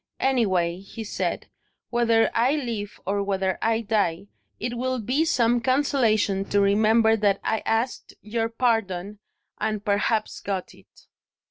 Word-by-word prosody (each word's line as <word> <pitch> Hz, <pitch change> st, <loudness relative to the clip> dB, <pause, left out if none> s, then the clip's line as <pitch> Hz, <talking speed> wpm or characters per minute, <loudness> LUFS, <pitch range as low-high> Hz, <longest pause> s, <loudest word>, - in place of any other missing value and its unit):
"Anyway," 185 Hz, -10 st, +1 dB
he 200 Hz, +3 st, -8 dB
said, 215 Hz, -, -3 dB, 0.5 s
"whether 230 Hz, -1 st, +3 dB
I 250 Hz, +5 st, +2 dB
live 230 Hz, -8 st, -4 dB
or 200 Hz, +2 st, 0 dB
whether 190 Hz, -1 st, -1 dB
I 225 Hz, 0 st, +1 dB
die, 200 Hz, -4 st, -1 dB, 0.3 s
it 240 Hz, 0 st, -3 dB
will 255 Hz, +1 st, -1 dB
be 255 Hz, +8 st, 0 dB
some 240 Hz, -5 st, +2 dB
consolation 235 Hz, -7 st, +2 dB
to 205 Hz, -, +1 dB
remember 220 Hz, +3 st, +4 dB
that 205 Hz, -2 st, +1 dB
I 220 Hz, -, 0 dB
asked 230 Hz, +3 st, -1 dB
your 225 Hz, +1 st, -2 dB
pardon 210 Hz, -5 st, -1 dB, 0.4 s
and 215 Hz, -1 st, -2 dB
perhaps 210 Hz, +2 st, 0 dB
got 195 Hz, -2 st, -4 dB
it." -, -, -22 dB
220 Hz, 135 wpm, -25 LUFS, 200-235 Hz, 0.5 s, remember